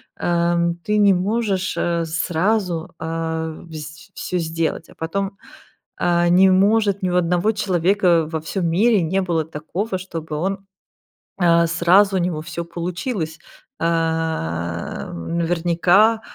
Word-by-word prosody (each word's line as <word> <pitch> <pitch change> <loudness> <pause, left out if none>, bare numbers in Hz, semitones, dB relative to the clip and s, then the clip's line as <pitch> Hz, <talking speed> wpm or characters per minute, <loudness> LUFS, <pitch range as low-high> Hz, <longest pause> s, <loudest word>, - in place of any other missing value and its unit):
Ам, 170 0 +1
ты 210 0 0
не 200 -2 +5
можешь, 195 0 -1
э, 170 -1 0
сразу, 175 +1 -1
а, 160 0 -3 0.2
вс 155 0 -9
всё 180 - -3
сделать, 165 0 -2
а - - -15
потом, 195 +5 -2 0.7
а, 175 0 +2
не 185 +2 +6
может 200 +1 +3
ни 185 - +1
у - - -1
одного 180 +3 +2
человека 185 -4 +2
во 160 - -1
всём 170 +5 -4
мире 205 +5 +3
не 190 +4 0
было 170 -4 0
такого, 185 +7 -3
чтобы 165 -4 -6
он, 190 +6 -1 0.8
а, 170 -2 +4
сразу 185 +4 +4
у - - +3
него 170 -3 -2
всё 170 +1 -5
получилось. 170 0 -4 0.4
Ам, 160 - -2
наверняка, 175 +6 +3
175 Hz, 130 wpm, -21 LUFS, 165-190 Hz, 0.8 s, не